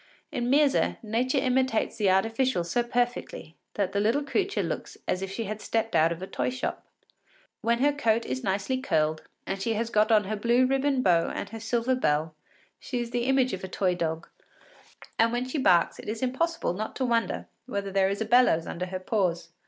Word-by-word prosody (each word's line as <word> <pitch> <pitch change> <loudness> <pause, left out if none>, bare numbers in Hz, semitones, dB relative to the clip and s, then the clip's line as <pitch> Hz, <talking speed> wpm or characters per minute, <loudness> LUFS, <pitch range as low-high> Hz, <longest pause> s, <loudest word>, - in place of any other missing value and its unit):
In 240 0 -2
Myrza, 280 0 +3
nature 240 +5 0
imitates 260 -3 +1
the 205 -4 +2
artificial 225 +2 +2
so 205 +8 0
perfectly 240 -8 -2 0.2
that 200 -3 0
the 200 - 0
little 230 +8 +2
creature 390 +7 -1
looks - - -5
as 185 - 0
if 195 - -3
she 225 +4 -3
had 215 0 -5
stepped 225 0 -1
out 160 +1 +4
of 170 +2 -5
a - - -2
toy - - -2
shop. 255 +1 -4 0.8
When 235 +2 +1
her 290 0 +4
coat 230 -5 +1
is 130 0 -4
nicely 200 +7 -1
curled, 155 -9 0 0.2
and 195 0 -4
she 225 +3 0
has 230 +2 -2
got 215 +2 +3
on 215 -1 +5
her 210 +2 -3
blue 235 +4 +3
ribbon 270 0 +1
bow 170 -2 +3
and - - -5
her 225 - -7
silver 235 +3 0
bell, 155 -10 0 0.5
she 250 - -4
is 235 -1 -4
the 240 0 -1
image 265 -2 +2
of 190 - -5
a - - -3
toy 185 0 0
dog, 165 -2 -3 0.9
and 230 +1 +4
when 245 +1 -1
she 270 +3 -2
barks 175 -9 +3
it - - -7
is 220 +3 -3
impossible 265 - 0
not 215 +4 -5
to 260 - -1
wonder 230 -2 0 0.2
whether 200 -4 -3
there 190 0 +3
is 200 +2 -3
a - - 0
bellows 240 -10 +4
under 180 +2 -4
her 185 0 -4
paws. 185 -4 -1
225 Hz, 205 wpm, -27 LUFS, 190-255 Hz, 0.9 s, on